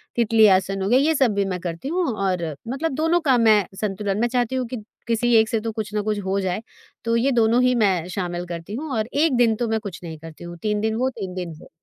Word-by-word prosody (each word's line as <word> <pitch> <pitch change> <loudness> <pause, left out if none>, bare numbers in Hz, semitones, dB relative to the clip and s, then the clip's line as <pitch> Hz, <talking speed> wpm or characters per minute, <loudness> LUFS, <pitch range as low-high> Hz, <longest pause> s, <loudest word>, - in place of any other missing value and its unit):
तितली 225 -2 +5
आसन 195 +1 -3
हो 195 - -1
गया, 250 +3 +5
ये 315 +3 +2
सब 260 -6 +3
भी 200 0 +1
मैं 185 -2 -3
करती 170 +7 -5
हूँ 355 +3 0
और 190 -4 -1 0.2
मतलब 275 +7 -2
दोनों 325 +4 +2
का 255 - +6
मैं 215 -4 +5 0.2
संतुलन 200 0 -1
मैं 240 - +3
चाहती 245 0 0
हूँ 255 -1 -1
कि 230 -2 -6 0.2
किसी 235 +1 +1
एक 220 -1 +5
से 225 - 0
तो 225 +1 -3
कुछ 215 -1 -5
ना 210 - 0
कुछ 210 0 -1
हो 195 +1 0
जाए, 190 +1 -2 0.4
तो 230 0 +1
ये 255 +4 +2
दोनों 235 0 +3
ही 250 0 +3
मैं 190 -7 +2
शामिल 175 -1 -3
करती 170 +3 -7
हूँ 300 +4 -5
और 215 0 -1
1 300 +1 +2
दिन 230 -2 +4
तो 240 +2 -2
मैं 220 0 0
कुछ 200 -5 -7
नहीं 160 -2 -7
करती 165 +1 -11
हूँ, 175 0 -8
3 210 -1 0
दिन 220 0 0
वो, 255 +3 +1
3 190 -7 -6
दिन 180 -3 -4
वो। - - -15
220 Hz, 265 wpm, -23 LUFS, 190-240 Hz, 0.4 s, का